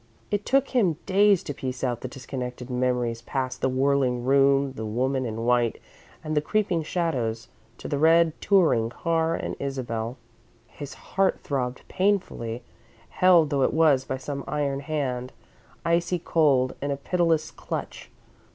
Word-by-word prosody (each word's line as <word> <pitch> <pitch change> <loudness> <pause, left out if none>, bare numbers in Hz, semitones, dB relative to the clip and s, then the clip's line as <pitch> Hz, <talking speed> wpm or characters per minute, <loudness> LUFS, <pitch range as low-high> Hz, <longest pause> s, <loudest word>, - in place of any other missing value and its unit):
It 205 0 -1
took 275 0 +3
him 195 - +2
days 200 -1 +4
to 145 - -5
piece 130 -1 -5
out 120 -2 -1
the - - -4
disconnected 125 -1 -6
memories 125 -2 0
past 130 +1 -3
the 130 - +2
whirling 130 -2 +1
room, 135 0 +4
the 110 - -6
woman 130 +4 -1
in 115 +1 -4
white 120 -1 +2 0.4
and 155 0 -3
the 150 - +3
creeping 185 -1 0
shadows, 130 -9 -2 0.3
to - - -8
the 145 - -1
red 165 +1 +5
touring 160 - +3
car 165 +4 0
and - - -4
Isabel. 125 -3 -3 0.5
His 145 +3 -9
heart 195 0 0
throbbed 125 -3 -3
painfully, 185 - -1 0.5
held 175 -5 +4
though 140 -1 +1
it 130 - +2
was 155 -5 +4
by 130 - -4
some 140 +1 -5
iron 140 -2 -1
hand, 135 -4 -3 0.5
icy 170 +1 +1
cold, 145 -6 +2
in 140 - -2
a 140 - -1
pitiless 165 +1 0
clutch. - - -6
140 Hz, 150 wpm, -25 LUFS, 125-165 Hz, 0.5 s, red